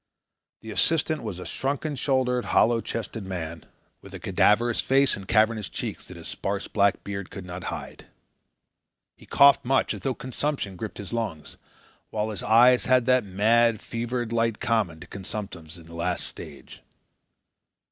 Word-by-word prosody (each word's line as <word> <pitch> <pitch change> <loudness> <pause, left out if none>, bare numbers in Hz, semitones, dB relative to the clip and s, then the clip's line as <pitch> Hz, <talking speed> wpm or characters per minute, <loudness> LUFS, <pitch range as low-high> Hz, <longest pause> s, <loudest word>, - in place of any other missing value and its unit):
The 110 - -8
assistant 155 +4 +1
was 105 -6 -5
a 90 - -7
shrunken 145 +2 -2
shouldered, 125 -3 +1
hollow 115 +2 +3
chested 110 -1 -5
man, 85 -4 -6 0.4
with - - -11
a - - -7
cadaverous 115 +3 +2
face 135 +1 +3
and 95 -1 -10
cavernous 110 -1 +2
cheeks - - -5
that - - -10
his - - -10
sparse 100 0 -3
black 100 -1 +2
beard 100 -2 -5
could 95 -2 -8
not 90 0 -7
hide. - - -7 1.1
He - - -18
coughed 140 0 +6
much, 135 +1 +1
as - - -7
though 135 -2 -1
consumption 130 -5 -3
gripped 110 +4 -6
his 100 +1 -7
lungs, 105 -10 -4 0.5
while 110 0 -2
his 105 - -5
eyes 120 +3 +5
had 130 -2 +4
that 130 -1 +4
mad, 110 +4 +3
fevered 120 +1 -3
light 115 -1 +1
common 110 -9 0
to - - -8
consumptives 95 -5 -7
in 85 - -14
the 85 - -13
last 85 +2 -2
stage. - - -11
110 Hz, 160 wpm, -26 LUFS, 100-125 Hz, 1.1 s, coughed